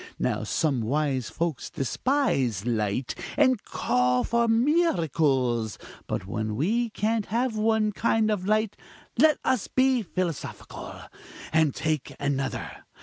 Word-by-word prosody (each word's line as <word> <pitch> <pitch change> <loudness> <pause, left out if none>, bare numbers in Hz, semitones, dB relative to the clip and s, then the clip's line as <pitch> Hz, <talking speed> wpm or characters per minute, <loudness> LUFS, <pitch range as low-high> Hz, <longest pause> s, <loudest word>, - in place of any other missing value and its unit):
Now, - - -1
some 140 -6 0
wise 135 +1 0
folks 165 -5 -3
despise 135 - 0
light, 115 +1 -1 0.2
and 260 -6 +3
call 125 0 +1
for 235 0 +1
miracles: 160 - +2 0.3
but - - -3
when 110 +2 -3
we 225 - +1
can't 220 0 -1
have 235 +2 0
one 215 0 +2
kind 220 +1 +1
of 195 -3 -2
light, 215 0 +1 0.4
let 305 +1 +6
us 260 -5 +1
be 260 -1 +2
philosophical, 180 -5 -5 0.5
and 160 -3 +3
take 155 -4 -2
another. 140 -1 -3
170 Hz, 120 wpm, -26 LUFS, -, 0.5 s, let